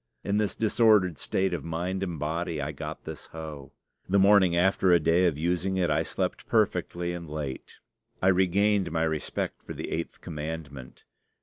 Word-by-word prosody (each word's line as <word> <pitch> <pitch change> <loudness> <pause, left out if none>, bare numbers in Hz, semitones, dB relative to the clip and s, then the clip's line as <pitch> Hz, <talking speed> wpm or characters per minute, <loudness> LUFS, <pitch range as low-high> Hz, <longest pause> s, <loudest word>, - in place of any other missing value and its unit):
In 100 +1 0
this 105 -1 0
disordered 105 -6 +3
state 95 -1 0
of 80 -5 -3
mind 85 +3 -3
and 90 -4 -3
body 80 +2 -2
I 70 +2 -2
got 70 - -7
this - - -8
hoe. 75 -4 -8 0.4
The 100 - +3
morning 95 -3 +5
after 95 +1 +3
a 85 - +6
day 85 +3 +3
of 80 -4 0
using 90 +4 0
it 90 -4 +1
I 75 +1 +2
slept - - -3
perfectly 85 0 0
and 85 -2 -7
late. 75 -3 -6 0.4
I 95 - +3
regained 95 0 +2
my 80 0 0
respect 80 -1 -2
for - - -7
the - - -6
Eighth 85 - -4
Commandment. 75 -5 -7
85 Hz, 175 wpm, -27 LUFS, 80-95 Hz, 0.4 s, a